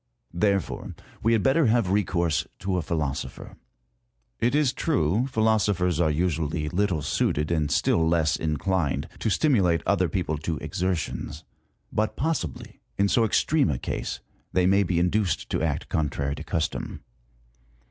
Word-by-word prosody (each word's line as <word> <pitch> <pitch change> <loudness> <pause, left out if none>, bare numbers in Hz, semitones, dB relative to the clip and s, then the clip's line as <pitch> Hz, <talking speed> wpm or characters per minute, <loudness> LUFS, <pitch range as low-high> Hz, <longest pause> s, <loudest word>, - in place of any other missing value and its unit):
Therefore, 100 +1 -1 0.3
we 115 - +3
had 110 - +2
better 135 +2 +4
have 110 -4 +2
recourse 85 -5 +1
to 95 0 -2
a - - 0
philosopher. 70 -5 -4 0.8
It 120 +4 +2
is 145 -4 +3
true, 120 - +1
philosophers 105 - +1
are 85 -2 +3
usually 75 -1 -1
little 90 -4 0
suited, 75 +2 0
and 75 -3 +1
still 80 -1 +2
less 80 -2 +2
inclined, 75 -1 -1
to 110 - 0
stimulate 95 - +2
other 90 -1 +2
people 80 -3 -2
to 80 +1 -2
exertions; 85 -4 -3 0.5
but 110 0 0
possibly 140 - -3 0.2
in 100 0 +3
so 115 - +3
extreme 140 - +2
a 70 - 0
case, - - -4 0.3
they 90 -1 +3
may 100 +2 +4
be 90 -3 0
induced 90 +2 0
to - - 0
act 80 -3 -1
contrary 70 -2 -1
to 75 - -7
custom. 80 0 -3
90 Hz, 145 wpm, -26 LUFS, 80-105 Hz, 0.8 s, better